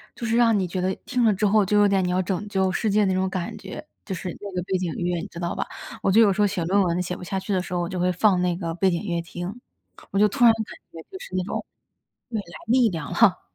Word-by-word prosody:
就 235 Hz, -, -5 dB
是 225 Hz, -, +1 dB
让 230 Hz, -3 st, +4 dB
你 185 Hz, -, -1 dB
觉 180 Hz, +1 st, -3 dB
得 185 Hz, +1 st, 0 dB
听 250 Hz, -1 st, 0 dB
了 220 Hz, -2 st, +5 dB
之 200 Hz, +2 st, 0 dB
后 205 Hz, 0 st, +4 dB
就 210 Hz, +2 st, +2 dB
有 205 Hz, -, +6 dB
点 195 Hz, -2 st, +2 dB
你 180 Hz, -, 0 dB
要 185 Hz, +1 st, +2 dB
拯 190 Hz, +2 st, -2 dB
救 190 Hz, -2 st, +1 dB
世 220 Hz, -, 0 dB
界 210 Hz, 0 st, +3 dB
那 190 Hz, -, +1 dB
种 185 Hz, 0 st, 0 dB
感 185 Hz, -2 st, -4 dB
觉， 190 Hz, -1 st, -8 dB, 0.2 s
就 190 Hz, -, -4 dB
是 180 Hz, +1 st, -5 dB
那 205 Hz, -, -6 dB
个 180 Hz, -, -1 dB
背 190 Hz, 0 st, -1 dB
景 180 Hz, -3 st, -2 dB
乐， 175 Hz, -1 st, -1 dB
你 -, -, -6 dB
知 170 Hz, -, -10 dB
道 170 Hz, -1 st, -2 dB
吧？ -, -, -2 dB, 0.4 s
我 195 Hz, -, +2 dB
就 220 Hz, -, +5 dB
有 205 Hz, -3 st, +5 dB
时 210 Hz, -, 0 dB
候 205 Hz, -, +5 dB
写 190 Hz, -4 st, -2 dB
论 195 Hz, +4 st, +3 dB
文 175 Hz, 0 st, 0 dB
写 180 Hz, 0 st, -3 dB
不 180 Hz, -, -9 dB
下 190 Hz, +2 st, -2 dB
去 195 Hz, +2 st, -3 dB
的 185 Hz, -, +1 dB
时 180 Hz, -, -7 dB
候， 175 Hz, -, 0 dB
我 175 Hz, -, -2 dB
就 180 Hz, +1 st, -4 dB
会 180 Hz, +1 st, +2 dB
放 180 Hz, 0 st, +3 dB
那 180 Hz, -1 st, +1 dB
个 165 Hz, -3 st, -3 dB
背 190 Hz, +3 st, +2 dB
景 170 Hz, -2 st, -1 dB
乐 170 Hz, -4 st, -1 dB
听。 175 Hz, +7 st, -7 dB, 0.5 s
我 195 Hz, -, 0 dB
就 210 Hz, -, +6 dB
突 210 Hz, -, -1 dB
然 230 Hz, -1 st, +8 dB
感 225 Hz, 0 st, -3 dB, 0.3 s
觉 165 Hz, -, -9 dB
就 380 Hz, -, -8 dB
是 -, -, -11 dB
那 185 Hz, -, +1 dB
种 185 Hz, -, -4 dB, 0.6 s
未 225 Hz, -3 st, -2 dB
来 -, -, -10 dB, 0.2 s
力 245 Hz, 0 st, +4 dB
量 160 Hz, -5 st, -5 dB
哈。 195 Hz, -6 st, +4 dB
190 Hz, 330 characters per minute, -24 LUFS, 180-210 Hz, 0.6 s, 然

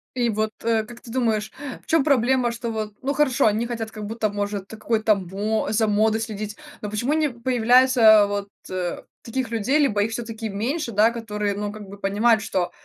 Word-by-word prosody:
И 240 Hz, -2 st, +1 dB
вот, 215 Hz, 0 st, -1 dB
э, 225 Hz, -1 st, +2 dB
как 240 Hz, +2 st, -12 dB
ты 245 Hz, -, -13 dB
думаешь, 220 Hz, -4 st, 0 dB, 0.3 s
в -, -, -26 dB
чем 325 Hz, -3 st, +3 dB
проблема, 255 Hz, -3 st, +2 dB
что 235 Hz, 0 st, -5 dB
вот, 215 Hz, -2 st, -4 dB
ну, 275 Hz, +2 st, -1 dB
хорошо, 290 Hz, -4 st, +2 dB
они 220 Hz, +2 st, +2 dB
хотят, 230 Hz, -2 st, -4 dB
как 215 Hz, -1 st, -7 dB
будто, 220 Hz, 0 st, -1 dB
может, 205 Hz, -1 st, -3 dB
та -, -, -9 dB
какой-то 220 Hz, 0 st, +1 dB
мо 200 Hz, +4 st, -2 dB
за 220 Hz, 0 st, +2 dB
модой 215 Hz, +1 st, +2 dB
следить, 215 Hz, -2 st, -5 dB, 0.2 s
но 210 Hz, -, -4 dB
почему 235 Hz, +7 st, -1 dB
не 310 Hz, -1 st, +2 dB
появляется 240 Hz, -3 st, +5 dB
вот, 200 Hz, 0 st, -3 dB, 0.2 s
э, 180 Hz, -2 st, -3 dB, 0.2 s
таких 245 Hz, 0 st, -3 dB
людей, 230 Hz, +6 st, +1 dB
либо 210 Hz, -9 st, +2 dB
их 220 Hz, -, -2 dB
всё 240 Hz, -, -3 dB
таки 220 Hz, -1 st, -5 dB
меньше, 235 Hz, +8 st, -2 dB
да, 220 Hz, +2 st, +4 dB
которые, 210 Hz, -3 st, -3 dB
ну, 205 Hz, 0 st, -3 dB
как 215 Hz, 0 st, -9 dB
бы, 200 Hz, -, -10 dB
понимают, 215 Hz, +3 st, +2 dB
что, 185 Hz, -4 st, -1 dB
220 Hz, 205 wpm, -23 LUFS, 210-240 Hz, 0.3 s, появляется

